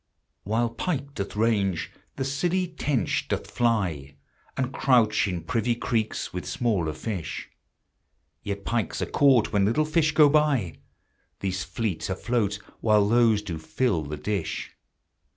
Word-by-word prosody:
While 115 +3 +1
pike 140 -1 -3
doth 100 -4 -5
range, 105 -5 +1 0.2
the 135 - -2
silly 175 +7 0
tench 145 - -1
doth - - -3
fly, 90 - 0 0.4
And 130 -1 -1
crouch 115 -6 +3
in 90 -4 -3
privy 115 +7 0
creeks 115 -2 -2
with 90 - -5
smaller 100 -10 0
fish; 85 -7 -5 0.9
Yet 100 -1 -5
pikes 115 -6 -1
are - - -6
caught 135 -6 +4
when 100 -1 +3
little 115 +10 +2
fish 155 0 +2
go 150 -1 +7
by; 140 - +2 0.6
These 95 -1 -1
fleet 105 -8 -3
afloat 105 +1 0 0.2
while 105 -2 +4
those 115 -2 +4
do 85 -6 -5
fill 85 +2 0
the 75 0 -5
dish. 100 +1 -3
110 Hz, 135 wpm, -26 LUFS, 95-130 Hz, 0.9 s, go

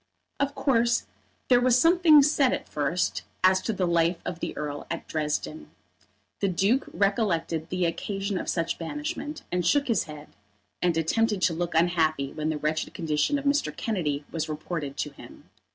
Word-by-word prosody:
Of 280 +1 0
course 235 -3 +2 0.4
there 245 -1 +5
was 250 -1 +4
something 330 0 +6
said 280 -2 +3
at - - -4
first 150 +5 -1 0.2
as 185 0 +5
to 225 - -2
the 190 -3 0
life 170 0 +2
of 175 -1 -4
the - - -4
Earl 145 -1 -5
at - - -5
Dresden. 155 0 -3 0.7
The 200 - +1
Duke 195 +8 +1
recollected 175 -6 0
the 185 -1 0
occasion 195 +3 -2
of - - -4
such 165 -1 -1
banishment, 295 - -5
and 180 0 0
shook 280 - +2
his 230 -6 +1
head; 150 -1 -10 0.5
and 175 -2 +2
attempted 205 +4 +1
to 170 - +3
look 175 0 -3
unhappy 160 -4 +2
when 155 0 -2
the 155 - -1
wretched 155 +1 -2
condition 160 - 0
of 280 - -6
Mr. 285 +1 +1
Kennedy 150 - -2
was 160 -1 -3
reported 150 -2 -4
to 150 - -2
him. 140 - -15
180 Hz, 170 wpm, -26 LUFS, 160-235 Hz, 0.7 s, something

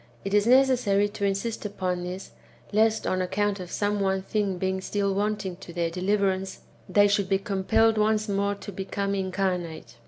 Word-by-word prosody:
It 195 - -3
is 210 +1 +3
necessary^ 245 -6 +4
to 200 - -2
insist 200 +3 -2
upon 185 -3 -2
this, 180 +2 -6 0.4
lest, 220 +1 +2
on 185 - 0
account 200 +2 0
of 180 -1 -7
some 205 +2 -1
one 190 -1 0
thing 200 -2 -1
being 190 +1 -1
still 200 0 -1
wanting 200 -2 -2
to 185 -2 -11
their 170 -1 -1
deliverance, 190 +1 0 0.3
they 205 0 +5
should 200 -1 +1
be 195 - +3
compelled 220 +2 +2
once 215 0 +2
more 200 0 0
to 200 0 -9
become 195 +1 -3
incarnate. 180 -9 -2
200 Hz, 175 wpm, -26 LUFS, 190-205 Hz, 0.4 s, they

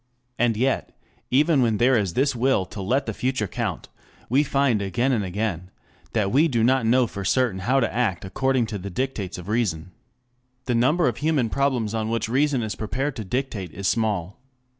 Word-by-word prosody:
And 120 -2 +2
yet, 130 +3 -1 0.3
even 145 +2 +3
when 115 -3 +2
there 125 +3 +4
is 100 -6 0
this 135 0 +2
will 120 -5 +2
to 100 +2 -8
let 130 +8 0
the 110 - -3
future 125 -2 -1
count, - - -4 0.4
we 130 +5 +4
find 135 -6 +1
again 100 +7 0
and 115 -5 +1
again 95 -2 -3 0.4
that 105 -4 +1
we 150 +6 +4
do 120 -7 +1
not 130 -1 +3
know 125 +2 +4
for 100 -3 -6
certain 115 -1 +1
how 125 +8 +2
to 115 - 0
act 110 -6 0
according 130 +5 +1
to 100 - -3
the 100 +2 -6
dictates 100 -3 -3
of 90 0 -9
reason. 95 -7 -1 0.7
The 125 - 0
number 140 +7 +3
of 120 - -1
human 145 -7 0
problems 130 -6 0
on 110 -1 -1
which 115 -1 -1
reason 135 +1 +1
is 110 - -3
prepared 130 +6 -3
to 110 - -4
dictate 110 -4 -3
is 100 -1 -2
small. 105 -5 -1
115 Hz, 195 wpm, -24 LUFS, 100-130 Hz, 0.7 s, there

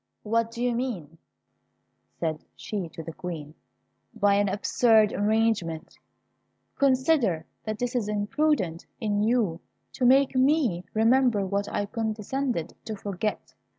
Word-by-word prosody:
"What 230 +1 +1
do 235 +1 -5
you 245 -1 +2
mean," 190 - -4 1.0
said 160 -2 -2
she 195 -6 -4
to 165 - -8
the 165 - -7
Queen, 155 -4 -6 0.6
"by 205 -2 +3
an 200 0 +2
absurd 215 +2 +3
arrangement! 205 -6 0 0.8
Consider, 260 - +2 0.2
that 215 +2 -3
it 245 0 -2
is 230 -4 0
imprudent 210 - 0
in 205 -2 0
you 215 -7 +1 0.3
to 255 - -4
make 270 +2 +5
me 255 - +2
remember 225 -2 +3
what 200 +1 -1
I - - -1
have 205 - -6
condescended 225 - -2
to 220 - -4
forget. 200 +1 -4
215 Hz, 130 wpm, -26 LUFS, 190-245 Hz, 1.0 s, make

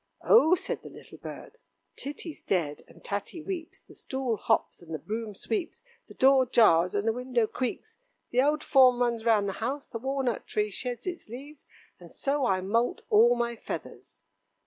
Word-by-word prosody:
"Oh!" 365 -6 +6
said - - -4
the - - -10
little - - -13
bird, - - -10 0.4
"Titty's 295 +3 -7
dead, 155 -6 -1
and - - -18
Tatty 205 - -4
weeps, 365 +1 -6
the - - -18
stool 260 -3 -3
hops, 220 -2 0
and 165 -2 -13
the - - -2
broom 215 +5 -5
sweeps, 370 - -4 0.2
the - - -14
door 265 -1 +5
jars, 180 -7 +4
and 205 +2 0
the 225 - +3
window 250 -1 0
creaks, 255 - -5 0.3
the 250 - +4
old 295 +2 +1
form 255 -3 +5
runs 235 -2 0
round 215 -3 +3
the 195 - -2
house, 270 +5 -3
the 230 - -5
walnut 265 -2 -2
tree 210 0 -1
sheds 245 +4 -4
its 355 - -5
leaves, 275 +5 -10 0.3
and - - -13
so 280 -2 0
I 185 -3 +1
moult 230 +6 0
all 235 +3 +6
my 235 0 -1
feathers." - - -8
245 Hz, 180 wpm, -28 LUFS, 215-275 Hz, 0.4 s, Oh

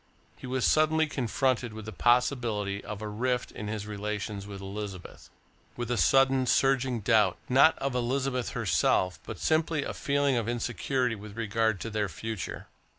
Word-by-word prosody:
He - - -10
was 130 0 0
suddenly 155 +1 +3
confronted 130 -3 -1
with 110 -1 -8
the 110 - -6
possibility 120 -5 +1
of 105 0 -6
a - - -3
rift 125 +4 -1
in 105 - -7
his 105 -1 -4
relations 105 -1 -4
with 100 -1 -7
Elizabeth; 100 -1 -7 0.5
with 120 0 -3
a - - +2
sudden 135 +4 +4
surging 130 -2 +2
doubt, 105 -4 +3
not 135 +5 +5
of 135 -1 -2
Elizabeth 125 +1 -1
herself 90 0 +1
but - - -5
simply 160 -1 +1
a - - -4
feeling 140 -2 +1
of 115 -1 -1
insecurity 120 +1 -1
with 105 0 -9
regard 110 -2 0
to 115 - -4
their 105 -2 -1
future. 110 +4 -5
115 Hz, 160 wpm, -28 LUFS, 105-130 Hz, 0.5 s, not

